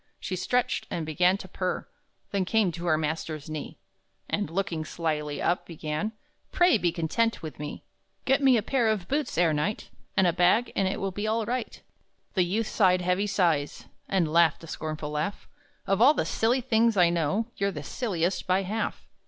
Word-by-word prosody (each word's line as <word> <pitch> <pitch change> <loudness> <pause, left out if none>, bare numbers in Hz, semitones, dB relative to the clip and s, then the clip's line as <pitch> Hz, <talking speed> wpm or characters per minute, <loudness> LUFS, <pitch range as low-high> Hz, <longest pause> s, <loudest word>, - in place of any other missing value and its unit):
She 185 - -3
stretched, 240 +7 0
and 165 - -3
began 180 +5 +3
to 195 - -9
purr, 185 -1 -3 0.5
Then 200 -2 +1
came 210 -1 +2
to 170 +1 -6
her 155 -2 +3
master's 155 -1 -3
knee, 155 -1 -6 0.5
And, 205 -6 -1
looking 175 -2 -2
slyly 150 -2 -3
up, 175 - 0
began: 155 +5 -3 0.4
"Pray 350 - +4
be 175 -2 +1
content 175 +6 0
with 155 -2 -7
me! 150 0 -6 0.4
Get 270 +2 +3
me 265 -3 +5
a 215 - 0
pair 245 0 +1
of 210 -5 0
boots 290 - -1
ere 170 -2 +4
night, 170 +8 -2 0.3
And 190 - +5
a 175 - +3
bag, 185 +7 +3
and 195 - +2
it 190 - -2
will 195 0 -2
be 205 +3 -3
all 220 0 0
right!" 245 +1 -3 0.5
The 190 - +2
youth 205 +6 0
sighed 185 -4 +3
heavy 180 +3 +1
sighs, 170 -8 0 0.2
And 170 -5 +1
laughed 165 -2 +4
a - - -9
scornful 155 -1 -5
laugh: 150 +7 -3 0.4
"Of 195 +2 +1
all 280 +5 +7
the - - 0
silly 240 +4 +1
things 230 -3 +2
I 175 -2 +5
know, 175 +8 0
You're 200 0 +1
the 150 -7 -6
silliest, 180 - -2
by 185 +1 +2
half!" 215 +4 -3
185 Hz, 190 wpm, -27 LUFS, 160-215 Hz, 0.5 s, all